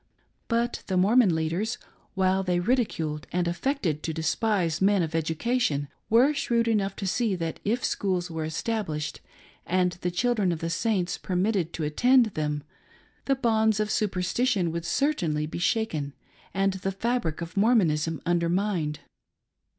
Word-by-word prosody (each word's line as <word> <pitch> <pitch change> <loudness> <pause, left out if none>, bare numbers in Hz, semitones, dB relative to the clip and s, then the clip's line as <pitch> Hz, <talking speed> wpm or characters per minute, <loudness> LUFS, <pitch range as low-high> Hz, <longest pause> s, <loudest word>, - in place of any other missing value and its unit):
But 235 0 0
the 185 - 0
Mormon 200 -1 +4
leaders, 170 +8 -1 0.4
while 190 0 +2
they 180 -2 0
ridiculed 170 - -1
and 175 -1 0
affected 175 - -1
to 160 - -3
despise 170 +1 0
men 195 -1 +4
of 160 -1 -4
education, 160 - 0 0.2
were 250 +7 +5
shrewd 235 -5 0
enough 200 -3 +1
to 195 - -5
see 210 +1 +1
that 165 -2 -4
if 235 +4 0
schools 180 -3 -1
were 160 -1 -3
established 160 -1 -3 0.4
and 180 0 +1
the 180 - 0
children 205 +1 +1
of 170 - -1
the 165 +1 -3
Saiijts 185 -2 -1
permitted 185 -2 0
to 160 - -3
attend 245 - +4
them, 150 -1 -2 0.6
the 275 - +2
bonds 220 -4 +2
of 215 0 0
superstition 200 -1 0
would 170 +1 -4
certainly 170 - 0
be 155 - -6
shaken 165 -8 -1 0.4
and 195 0 +1
the 190 +1 -3
fabric 195 -5 -1
of 170 0 -7
Mormonism 165 - +2
undermined. 175 -2 0
185 Hz, 145 wpm, -27 LUFS, 165-225 Hz, 0.6 s, were